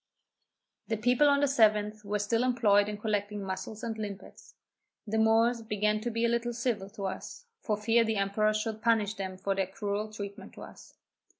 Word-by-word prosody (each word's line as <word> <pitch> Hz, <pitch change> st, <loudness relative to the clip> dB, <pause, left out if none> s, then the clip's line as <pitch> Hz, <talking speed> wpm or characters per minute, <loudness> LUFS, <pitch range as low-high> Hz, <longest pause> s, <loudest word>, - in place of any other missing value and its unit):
The 225 Hz, -, -1 dB
people 250 Hz, +6 st, +4 dB
on 280 Hz, 0 st, +3 dB
the -, -, +5 dB
7th 215 Hz, -5 st, +2 dB
were 205 Hz, +1 st, -1 dB
still 225 Hz, +3 st, 0 dB
employed 210 Hz, -5 st, +3 dB
in 210 Hz, -, -4 dB
collecting 205 Hz, -1 st, -2 dB
muscles 195 Hz, +4 st, -5 dB
and 230 Hz, -1 st, -3 dB
limpets. 200 Hz, -2 st, -8 dB, 0.5 s
The 220 Hz, +1 st, -1 dB
Moors 225 Hz, +2 st, +3 dB
began 210 Hz, -1 st, 0 dB
to 240 Hz, -, -2 dB
be 230 Hz, 0 st, 0 dB
a -, -, +4 dB
little 235 Hz, +1 st, 0 dB
civil 225 Hz, -5 st, -2 dB
to 200 Hz, -1 st, -8 dB
us, 190 Hz, -, -6 dB
for 210 Hz, -2 st, -1 dB
fear 225 Hz, +2 st, +3 dB
the 220 Hz, -1 st, -1 dB
emperor 215 Hz, +2 st, +1 dB
should 215 Hz, 0 st, -3 dB
punish 220 Hz, -3 st, +2 dB
them 190 Hz, -2 st, -5 dB
for 195 Hz, +1 st, -1 dB
their 195 Hz, -1 st, -1 dB
cruel 205 Hz, +2 st, -3 dB
treatment 200 Hz, -1 st, -8 dB
to -, -, -12 dB
us. -, -, -14 dB
215 Hz, 190 wpm, -29 LUFS, 205-230 Hz, 0.5 s, the